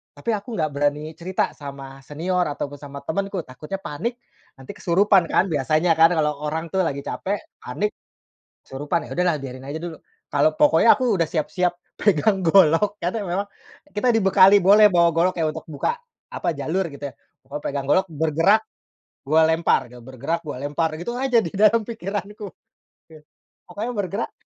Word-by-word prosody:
Tapi, - - -6
aku 205 +2 -8
nggak 155 -3 -1
berani 145 +2 -1
cerita 185 +2 -1
sama 135 -1 -9
senior 175 +5 -1
ataupun 145 -1 -5
sama 140 0 -9
temanku, 195 +2 -3
takutnya 150 +9 -7
panik, 205 +9 -4 0.4
nanti 135 -1 -10
kesurupan 185 0 +3
kan, 185 - +3
biasanya 155 +4 +1
kan, 165 +2 +7
kalau 150 -1 +2 0.2
orang 160 +2 -3
tuh 190 - 0
lagi 140 0 -4
capek, 200 +2 -3 0.2
panik, 205 +12 -3 0.7
kesurupan. 145 +5 -3
Ya - - -14
udahlah, 180 -3 +2
biarin 130 0 -8
aja 145 - -4
dulu. 170 -2 -6 0.4
Kalau 145 +2 +4
pokoknya 165 +11 +5
aku 250 -5 +1
udah 160 - +1
siap-siap 175 +3 0 0.2
pegang 195 +1 +2
golok, 185 +4 +4
karena 185 +6 -2
memang 195 +2 -2 0.5
kita 210 +4 +2
dibekali, 195 -2 +6
boleh 205 +3 +6
bawa 170 -1 +5
golok 175 +2 +2
kayak 160 -1 +1
untuk 160 - -8
buka, 145 - -1 0.4
apa, - - -3
jalur, 180 +6 -1
gitu 140 0 -9
ya. - - -31 0.3
Pokoknya 140 +3 -8
pegang 140 -1 -3
golok, 190 +6 +3
"Bergerak, 165 +8 +2 0.6
gua 155 +3 +4
lempar," 165 +1 +2
gitu, 125 - -12
"bergerak, 135 +6 -3
gua 145 - -5
lempar." 150 +3 -1
Gitu 240 - -4
aja, 260 -2 +1
di 170 - -5
dalam 215 +3 +4
pikiranku. 205 -1 -6 0.7
Gih. 155 -1 -14 0.5
Pokoknya 210 +7 -4
bergerak 200 -1 -3
170 Hz, 165 wpm, -22 LUFS, 150-195 Hz, 0.7 s, kan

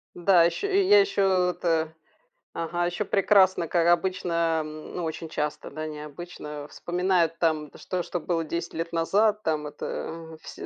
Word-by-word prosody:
Да, 175 -1 +5
ещё, 175 - 0
я 400 +1 +6
ещё 190 - +2
это 165 -3 -1 0.6
ага, 175 +1 -1
ещё 175 +4 -1
прекрасно, 190 -3 +4
как 170 +1 +2
обычно, 170 -2 +1
м, 155 0 -9
ну, 180 - -3
очень 160 +1 -5
часто, 150 -1 -4
да, 155 +2 -5
не 150 -1 -7
обычно 150 -1 -8
вспоминают 175 -2 0
там 155 -3 0
что 180 -1 -3
что 175 - -3
было 165 0 -1
10 170 +2 -4
лет 165 +1 -4
назад. 205 +6 +2
Там 155 -2 -1
это, 145 - -5
мгм, 165 -1 -10
все - - -9
170 Hz, 165 wpm, -26 LUFS, 160-185 Hz, 0.6 s, я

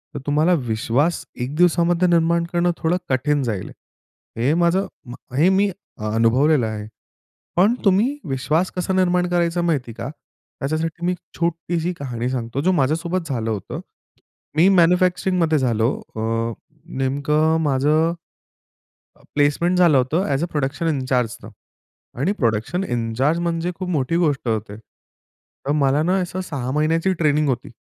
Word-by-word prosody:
तर - - -3
तुम्हाला 150 +5 +3
विश्वास 120 +9 0 0.2
एक 130 +4 -3
दिवसामध्ये 175 +1 +3
निर्माण 170 0 +3
करणं 175 0 +2
थोडं 165 +2 +1
कठीण 140 +2 +1
जाईल. 110 -6 -3 0.7
हे 125 +6 +2
माझं 175 +3 +2 0.5
हे 165 +6 +5
मी 195 +1 +3 0.4
अनुभवलेलं 125 +5 +3
आहे. 105 -1 -5 0.7
पण 200 +7 +4
तुम्ही 210 +8 +3
विश्वास 150 +7 0
कसा 180 +1 -1
निर्माण 180 -1 +2
करायचा 175 0 +1
माहिती 145 -8 0
आहे - - -9
का? 130 - -4 0.5
त्याच्यासाठी 160 +4 -2
मी 180 - +2
एक 180 - -6 0.2
छोटीशी 170 +1 -1
कहाणी 125 -3 -3
सांगतो, 125 0 -3
जो 185 +6 +2
माझ्यासोबत 165 +3 0
झालं 115 -4 -1
होतं. 105 -4 -4 0.8
मी 170 +4 +6
मॅन्युफॅक्चरिंगमध्ये 180 -2 +3
झालो 115 -3 +1 0.3
अ, 115 +1 -1 0.5
नेमकं 150 +4 +1
माझं 150 +3 +2 1.2
प्लेसमेंट 150 +5 +2
झालं 170 -6 +5
होतं 150 +9 +1
ॲज 140 +1 0
अ - - -1
प्रॉडक्शन 145 +3 -2
इनचार्जने 125 -6 -1 0.7
आणि 155 +9 +1
प्रॉडक्शन 120 - -1
इनचार्ज 120 +4 0
म्हणजे 170 0 -1
खूप 185 0 -5
मोठी 150 -2 0
गोष्ट 150 -7 0
होते. 110 -2 -2
तर 125 +4 -12
मला 140 0 +2
ना 180 +3 +2
असं 180 +1 -4
6 140 -8 -4
महिन्याची 160 +5 +1
ट्रेनिंग 150 -3 +1
होती. 125 -1 -2
155 Hz, 140 wpm, -21 LUFS, 130-175 Hz, 1.2 s, मी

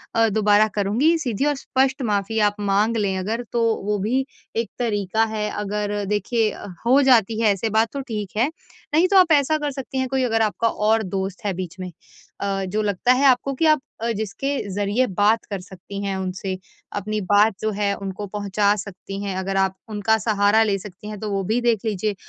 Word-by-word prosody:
अ, 225 0 +4
दोबारा 210 0 +4
करुँगी, 225 +12 +2
सीधी 270 -4 -1
और 295 - +2
स्पष्ट 265 0 0
माफ़ी 215 -1 0
आप 205 - -12
माँग 205 +3 +1
लें 195 -3 0
अगर 220 +6 -2
तो 235 -1 +1 0.2
वो 210 0 0
भी 255 +7 0 0.3
एक 230 0 -1
तरीका 220 -2 0
है। 210 -1 -1
अगर 205 0 -2
देखिए 215 +1 +1 0.3
हो 265 +4 +5
जाती 230 -4 +4
है 220 - +4
ऐसे 210 +3 -2
बात 220 +1 +2
तो 280 - -3
ठीक 215 -6 -5
है, 245 +5 +3 0.5
नहीं 330 +4 +5
तो 390 +1 +4
आप 365 -3 +6
ऐसा 300 +1 +4
कर 295 -1 -2
सकती 270 -1 -6
हैं 260 - 0
कोई 265 -1 0
अगर 225 -2 +1
आपका 220 +1 +1
और 220 0 +1
दोस्त 190 +1 -4
है 200 - 0
बीच 175 -2 -6
में 185 -1 -5 0.5
अ, 195 -1 -1
जो 205 +4 -1
लगता 210 +3 +1
है 265 +2 +2
आपको 270 +1 +3
कि 300 +5 0
आप 310 -1 +5 0.2
अ, 235 +1 0
जिसके 225 +7 -2 0.2
ज़रिए 205 +5 +1
बात 210 +4 +2
कर 200 - -2
सकती 195 +1 -9
हैं 195 -1 -2
उनसे, 185 0 -3 0.4
अपनी 215 +1 -2
बात 205 +3 +4
जो 215 0 0
है 200 0 0
उनको 195 +1 -5
पहुँचा 205 0 +1
सकती 195 0 -7
हैं, 195 -2 -3
अगर 195 +1 -2
आप 190 0 +1
उनका 215 +1 +1
सहारा 210 +1 +3
ले 205 -2 +1
सकती 200 +1 -11
हैं 210 - -7
तो 215 - -4
वो 195 -1 -1
भी 220 +6 0
देख 235 -3 +2
लीजिए। 210 0 -1
210 Hz, 205 wpm, -22 LUFS, 200-235 Hz, 0.5 s, आप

